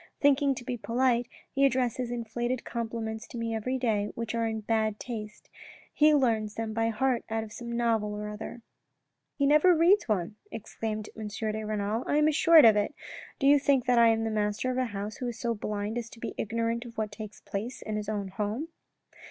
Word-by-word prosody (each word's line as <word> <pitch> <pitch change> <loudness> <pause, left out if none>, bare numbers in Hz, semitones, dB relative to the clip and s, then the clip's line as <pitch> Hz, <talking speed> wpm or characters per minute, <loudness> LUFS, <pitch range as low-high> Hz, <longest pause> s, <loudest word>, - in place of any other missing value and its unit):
Thinking 280 -1 +3
to 245 - -7
be 250 -1 -3
polite, 240 +1 +1 0.2
he 275 - +1
addresses 255 -2 +1
inflated 240 +1 -3
compliments 225 -1 -4
to - - -8
me 230 -1 -2
every 250 +4 -1
day, 215 -5 0
which 230 -1 -4
are 230 -1 0
in 220 -1 -3
bad 220 -1 0
taste. 215 -3 -7 0.5
He 305 0 +5
learns 225 -6 +1
them 225 -1 -3
by 225 0 +1
heart 250 +2 0
out 225 0 -1
of 215 -1 -10
some 235 0 -7
novel 225 -3 +1
or 210 0 -4
other." 215 +2 -7 0.3
" - - -54
He 280 - +2
never 305 +5 +6
reads 350 - +4
one," 205 0 -1
exclaimed 215 0 -5
M. 220 -1 -5
de 215 +1 -3
Renal. 215 +2 -1
" - - -10
I 290 - +2
am 300 0 +4
assured 320 0 +7
of 220 -2 +7
it. 210 +8 0 0.4
Do 275 - -1
you 285 +1 +7
think 275 -2 +2
that 245 -1 +4
I 230 - +7
am 225 0 +3
the 225 - -1
master 210 +4 0
of 255 - -3
a 255 - +1
house 205 -1 -5
who 250 - -3
is 235 -2 -4
so 235 -1 0
blind 210 +1 -3
as 230 -1 -7
to 230 - -14
be - - -5
ignorant 230 +2 -1
of 235 -2 -12
what 215 -1 -2
takes 210 -1 -9
place 220 +6 -5
in 215 - -4
his 210 0 -3
own 205 -2 -2
home." 215 - -3
230 Hz, 220 wpm, -29 LUFS, 215-250 Hz, 0.5 s, assured